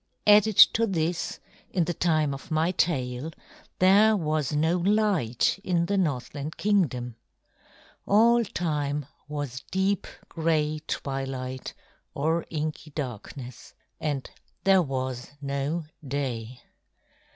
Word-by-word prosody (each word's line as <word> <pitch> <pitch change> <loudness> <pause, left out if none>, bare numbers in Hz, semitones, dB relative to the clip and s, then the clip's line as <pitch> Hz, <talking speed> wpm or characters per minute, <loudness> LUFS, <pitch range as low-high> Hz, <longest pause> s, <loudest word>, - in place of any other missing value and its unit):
Added 210 0 +6 0.2
to 230 0 +2
this, 170 -2 -1 0.3
in 180 - +1
the 175 - -2
time 155 -4 +1
of 135 - -9
my 160 +2 +1
tale 135 -6 -1 0.5
there 205 +4 +5
was 155 -4 -1
no 160 +4 +2
light 195 - +1
in 170 -2 +1
the 200 - 0
Northland 150 -3 -2
Kingdom. 130 - 0 0.9
All 235 +3 +5
time 150 - -2 0.2
was 145 -4 -4
deep 190 0 0 0.2
gray 155 -2 0
twilight 135 -1 -4 0.4
or 160 +4 0
inky 155 0 -4
darkness, 125 -2 -7 0.2
and 145 -4 -2 0.4
there 195 -1 +5
was 130 -4 -3
no 140 +4 -2 0.2
day. 130 -4 -4
155 Hz, 105 wpm, -27 LUFS, 135-180 Hz, 0.9 s, Added